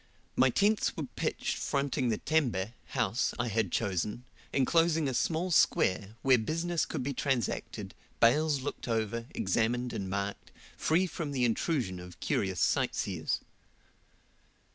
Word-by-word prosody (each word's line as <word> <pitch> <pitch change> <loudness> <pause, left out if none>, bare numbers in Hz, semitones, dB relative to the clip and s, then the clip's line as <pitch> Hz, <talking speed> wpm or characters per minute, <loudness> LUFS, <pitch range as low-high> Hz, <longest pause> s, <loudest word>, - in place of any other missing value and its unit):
My 130 - +5
tents 205 - +2
were 155 - -2
pitched - - -1
fronting 140 -2 0
the 110 - +1
tembe 120 -10 0
(house) 120 -3 0
I 120 0 -1
had 110 -4 0
chosen, 105 +2 -1 0.3
enclosing 165 +2 +3
a 130 - -1
small 170 +7 0
square, 100 - +3
where 130 -2 +5
business 165 +8 -1
could - - -3
be 140 +2 -2
transacted, 135 -2 -2 0.3
bales 145 +4 +4
looked 145 -1 -5
over, 115 0 -1
examined, 120 +5 0
and 95 -1 -3
marked, 100 +1 -3 0.2
free 170 +4 +2
from 165 -5 -4
the 125 -2 +2
intrusion 115 - 0
of 90 -1 -11
curious 95 -3 0
sightseers. 85 -5 0
125 Hz, 135 wpm, -31 LUFS, 105-150 Hz, 0.3 s, My